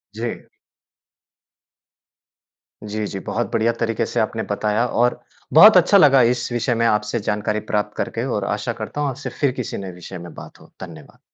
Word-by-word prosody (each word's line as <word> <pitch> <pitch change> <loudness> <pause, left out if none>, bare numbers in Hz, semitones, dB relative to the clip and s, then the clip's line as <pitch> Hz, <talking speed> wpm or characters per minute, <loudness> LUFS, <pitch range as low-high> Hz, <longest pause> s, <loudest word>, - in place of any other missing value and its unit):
जी। 115 +1 -5 2.4
जी, 105 0 -4
जी। 95 - -6
बहुत 120 -4 -3
बढ़िया 115 +1 +2
तरीके 115 -1 -1
से 120 - -3
आपने 110 0 -1
बताया 105 +3 0
और 120 +1 +1 0.3
बहुत 200 +6 +9
अच्छा 190 +3 +5
लगा 140 -7 +6
इस 120 - -5
विषय 120 +1 0
में 115 0 +1
आपसे 105 +1 0
जानकारी 105 +1 -2
प्राप्त 105 0 -1
करके 115 +2 -3
और 105 -7 -2
आशा 105 +3 -2
करता 115 +7 -6
हूँ 145 - 0
आपसे 135 +2 -6
फिर 140 -3 +2
किसी - - -5
नए 95 -1 -6
विषय 90 +1 -10
में 85 0 -10
बात - - -12
हो। - - -19
धन्यवाद। 80 -5 -11
110 Hz, 175 wpm, -21 LUFS, 105-120 Hz, 2.4 s, बहुत